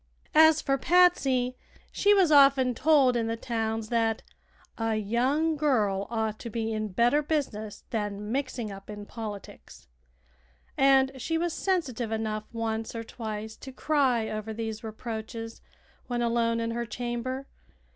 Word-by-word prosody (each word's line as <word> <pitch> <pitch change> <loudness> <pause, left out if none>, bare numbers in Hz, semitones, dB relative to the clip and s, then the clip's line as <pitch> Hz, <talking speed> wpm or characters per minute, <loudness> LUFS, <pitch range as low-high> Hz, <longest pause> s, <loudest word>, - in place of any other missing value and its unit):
As 315 0 +6
for 275 -1 +1
Patsy, 270 -8 +3 0.4
she 410 - +3
was 380 -6 +5
often 275 -3 +6
told 275 -2 +4
in 230 -1 0
the 225 - -1
towns 225 -2 -2
that 225 -2 0 0.6
"a 225 -1 0
young 255 +10 +1
girl 215 -10 +1
ought 220 -2 -2
to 235 - -6
be 225 0 -2
in 215 0 -2
better 235 +9 +2
business 255 -9 -3
than 210 -1 -3
mixing 255 -4 -2
up 195 +1 -11
in 205 -1 -7
politics," 210 -3 -9 0.9
and 270 -1 +4
she 325 +6 -1
was 340 0 -1
sensitive 265 - -1
enough 215 -1 -2
once 225 0 -3
or 230 - -4
twice 220 -1 -6
to 265 - -9
cry 260 -5 +1
over 215 0 -4
these 220 -1 -5
reproaches 225 0 -6 0.5
when 240 -1 -1
alone 230 0 +1
in 230 0 -2
her 235 0 -3
chamber. 245 +3 -4
235 Hz, 145 wpm, -28 LUFS, 220-270 Hz, 0.9 s, As